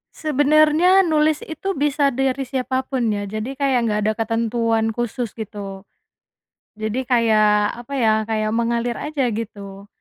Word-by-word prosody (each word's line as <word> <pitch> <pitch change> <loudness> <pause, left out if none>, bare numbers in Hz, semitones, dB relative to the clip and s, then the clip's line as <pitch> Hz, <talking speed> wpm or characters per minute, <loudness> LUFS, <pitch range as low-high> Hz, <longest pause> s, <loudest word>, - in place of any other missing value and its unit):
Sebenarnya 310 +5 +4
nulis 310 -2 +1
itu 385 +5 -4
bisa 290 0 +1
dari 270 0 -1
siapa 260 0 -2
pun 260 -3 -1
ya 205 -1 -3
jadi 215 +5 -4
kayak 270 -2 +1
nggak 210 -2 0
ada 215 - +2
ketentuan 225 0 0
khusus 240 -1 -3
gitu. 200 -3 -7 0.9
Jadi 220 +4 -3
kayak 215 -4 +3
apa 240 +3 -9
ya 225 -5 +3
kayak 215 -1 -1
mengalir 235 +1 -1
aja 280 -5 -1
gitu, 200 -2 -7
240 Hz, 140 wpm, -21 LUFS, 215-275 Hz, 0.9 s, Sebenarnya